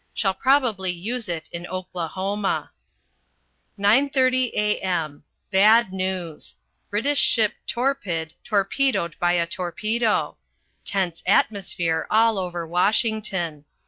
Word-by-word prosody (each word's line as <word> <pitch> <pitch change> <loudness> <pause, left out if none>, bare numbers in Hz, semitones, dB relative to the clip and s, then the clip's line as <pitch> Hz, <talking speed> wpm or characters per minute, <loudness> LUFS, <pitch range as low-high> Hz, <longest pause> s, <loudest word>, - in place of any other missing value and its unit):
Shall 195 -3 +1
probably 235 -5 +2
use 215 +6 -3
it 165 -2 -3
in 175 0 -6
Oklahoma. 185 +2 -3 1.1
9.30 255 +4 +3
a.m. 180 -8 -1 0.3
Bad 210 +1 +5
news. 185 -4 -4 0.3
British 275 +8 +1
ship 220 -3 +3
Torpid 200 - -1
torpedoed 205 - 0
by 175 0 +2
a 170 -1 +2
torpedo. 210 +5 -1 0.5
Tense 185 -5 -1
atmosphere 180 -5 +1
all 225 -1 +3
over 175 -2 -4
Washington. 180 - 0
195 Hz, 95 wpm, -23 LUFS, 175-225 Hz, 1.1 s, Bad